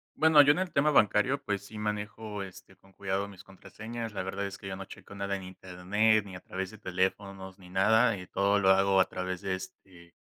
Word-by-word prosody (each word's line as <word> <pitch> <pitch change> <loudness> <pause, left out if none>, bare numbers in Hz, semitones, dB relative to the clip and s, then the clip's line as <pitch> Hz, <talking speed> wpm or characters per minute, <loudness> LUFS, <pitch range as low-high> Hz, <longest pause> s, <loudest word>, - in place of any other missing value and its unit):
Bueno, 160 -2 +7
yo 145 - +6
en 150 - 0
el 185 -1 -2
tema 150 +2 +3
bancario, 130 +3 +3
pues, 100 -4 -3
sí 105 +1 -9
manejo, 105 0 -4
este, 95 -2 -12
con 95 0 -24
cuidado 100 0 -2
mis 100 -2 -13
contraseñas. 110 +4 -8
La 100 - -3
verdad 95 +2 -3
es 100 0 -7
que 100 - -8
yo 95 - -4
no 95 0 -7
checo 100 +1 -12
nada 100 0 -2
en 95 - -6
Internet, 95 +4 0
ni 95 -2 -9
a - - -7
través 95 0 -5
de 110 - -12
teléfonos, 95 0 -3
ni 90 -2 -15
nada, 110 +5 +4
eh, 90 -2 -9
todo 100 +1 +2
lo 95 -1 +3
hago 95 0 +4
a - - +4
través 90 0 -4
de, 95 -2 -1
este, 95 -2 -12
100 Hz, 230 wpm, -29 LUFS, 95-105 Hz, -, Bueno